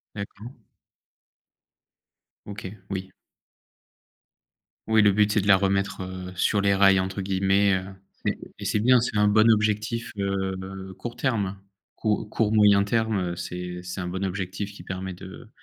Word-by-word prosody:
D'accord. 105 +3 -7 1.9
OK, 100 -1 -7 0.2
oui. 95 -1 -4 1.8
Oui 110 -1 +5
le 105 -1 +5
but, 105 +1 +3
c'est 105 - +2
de 100 - -4
la 95 -2 +7
remettre, 100 0 0
heu, 90 0 -6
sur 100 +3 +2
«les 100 0 +3
rails» 95 -1 +5
entre 95 +1 -2
guillemets, 95 +1 +2
heu 95 +1 -5 0.6
et - - -6
c'est 105 - +1
bien, 125 +1 +6
c'est 115 -2 -2
un 105 0 +4
bon 110 +2 +5
objectif 110 +1 +1
heu, 95 -1 -3
court 120 0 -6
terme, 105 -7 -1 0.4
court 105 -1 -1
court 110 -2 0
moyen 105 -2 +5
terme, 110 0 0
heu, 90 -1 -2
c'est 90 0 -5
c'est 90 +1 -6
un 90 - -4
bon 95 +2 -3
objectif 95 +2 -4
qui - - -12
permet 95 0 -5
de 95 +5 -11
100 Hz, 155 wpm, -25 LUFS, 95-105 Hz, 1.9 s, la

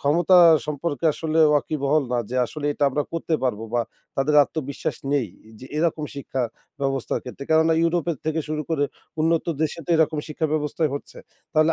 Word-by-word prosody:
ক্ষমতা 170 +5 +4 0.3
সম্পর্কে 150 0 -3
আসলে 160 +1 -2
ওয়াকিবহল 150 0 +1
না 125 - +1
যে, 130 - -2
আসলে 145 +6 -5
এটা 145 - 0
আমরা 145 +3 0
করতে 165 0 -1
পারবো 115 -3 -1
বা 120 - +3 0.3
তাদের 135 +3 +1
আত্মবিশ্বাস 140 -2 -4 0.2
নেই 135 -7 +1 0.3
যে, 130 - -10
এরকম 160 -1 0
শিক্ষা 135 -2 -3 0.4
ব্যবস্থার 135 -2 -1
ক্ষেত্রে। 130 +2 -8
কেননা 160 +1 +4
ইউরোপের 170 -1 +1
থেকে 160 +1 0
শুরু 155 0 -2
করে 145 -3 +2 0.4
উন্নত 165 +1 +2 0.2
দেশে 155 +1 -1
তো - - -4
এরকম 160 -1 +2
শিক্ষা 155 +1 -1
ব্যবস্থাই 155 +1 0
হচ্ছে। 140 - -8 0.3
তাহলে 155 +1 +4
150 Hz, 170 wpm, -23 LUFS, 140-160 Hz, 0.4 s, ক্ষমতা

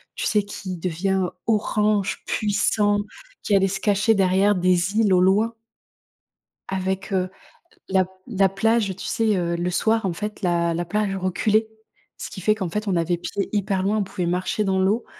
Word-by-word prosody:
tu - - -3
sais? 210 -2 +2
Qui 195 -2 -6
devient 185 +2 -1 0.2
orange, 210 -2 +1
puissant, 205 0 +1 0.5
qui 205 - +2
allait 195 0 +4
se 195 - -3
cacher 205 +2 +3
derrière 195 +1 +3
des 180 +2 +1
îles, 210 -4 +4
au 180 - +4
loin 210 +5 +3 1.2
avec, 190 +1 -3
heu, 185 -1 0 0.6
l 190 - -7
la 185 -1 +4 0.2
la 195 -5 +2
plage, 205 0 +1
tu - - -7
sais? 220 -3 +1
Heu, 170 -1 -1
le 175 +1 -1
soir, 220 +4 +1
en 185 - 0
fait, 210 +4 -6
la 170 -2 +1
la 175 +1 -2
plage 205 +2 -1
reculait, 210 +4 +1 0.5
ce - - -6
qui - - -8
fait 215 +3 +2
qu'en 190 -5 -3
fait, 210 +3 -3
on 185 - +1
avait 170 +1 0
pied 200 +3 -3
hyper 200 -2 0
loin. 210 +2 +1
On - - +1
pouvait 185 -2 -4
marcher 180 +4 -1
dans 190 -1 +1
l'eau 205 +5 +1
195 Hz, 185 wpm, -23 LUFS, 185-210 Hz, 1.2 s, allait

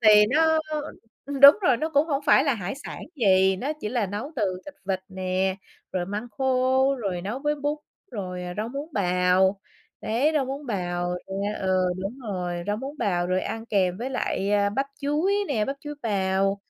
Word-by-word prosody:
này 210 -2 +7
nó 320 +2 +4 0.8
đúng 280 +7 +10
rồi, 260 -8 +4
nó 310 +6 -2
cũng 290 +1 +3
hổng 280 -2 -1
phải 270 - +6
là 280 -4 +2
hải 195 -1 -4
sản - - -6 0.2
gì, 190 -6 +4
nó 275 +10 -2
chỉ 210 - -3
là 230 -3 0
nấu 210 - -5
từ 190 -5 -1
thịt 290 - -10
vịt 190 -1 0
nè, 190 0 -1 0.4
rồi 175 -1 -1
măng 210 +4 -4
khô, 260 +1 +3
rồi 195 -7 -3
nấu 210 +7 -3
với 295 +2 0
bún, 290 +1 -2 0.3
rồi 185 -6 -5
rau 215 +2 -2
muống 280 +4 -5
bào, 185 0 +2 0.4
đấy, 250 +8 +1
rau 290 -3 +2
muống 275 +2 -6
bào 175 -4 -2
nè, 200 +2 -2
ừ, 185 -1 +2 0.2
đúng 215 +8 -5
rồi, 185 -7 -4
rau 205 0 0
muống 275 +6 -7
bào 175 -3 0
rồi 185 +1 +1
ăn 225 +3 -5
kèm 185 -5 +1
với 250 +3 -3
lại, 200 -6 -1
ơ, 200 -1 +3
bắp 270 +7 -1
chuối 300 +7 +1
nè, 225 -7 +1
bắp 275 +4 -3
chuối 295 0 -6
bào 195 -2 +1
210 Hz, 195 wpm, -25 LUFS, 190-275 Hz, 0.8 s, đúng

